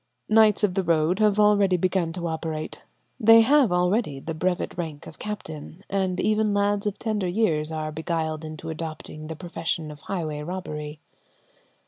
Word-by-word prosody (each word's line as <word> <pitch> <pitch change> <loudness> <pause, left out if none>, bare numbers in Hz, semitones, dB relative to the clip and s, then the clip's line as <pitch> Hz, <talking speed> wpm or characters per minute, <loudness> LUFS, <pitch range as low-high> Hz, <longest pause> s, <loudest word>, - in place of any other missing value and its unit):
Knights 215 -1 +5
of 200 -3 +3
the 195 - +1
road 165 +1 +2
have 210 -1 +3
already 205 -3 +4
begun 180 -1 0
to 175 -1 -5
operate; 160 -1 -4 0.4
they 225 0 +8
have 265 -2 +4
already 180 - +1
the 160 +4 -5
brevet 180 +3 -1
rank 160 -4 -5
of - - -12
captain, 175 -4 -7
and 190 -2 0
even 215 -1 +2
lads 205 0 +1
of 205 0 -2
tender 215 -5 -1
years 170 -6 +1
are 155 -1 -3
beguiled 160 0 -2
into 155 +1 -6
adopting 155 -1 -7
the 160 - -5
profession 165 -2 -3
of 150 - -11
highway 155 -5 -4
robbery. 150 -3 -6
175 Hz, 160 wpm, -25 LUFS, 155-205 Hz, 0.4 s, they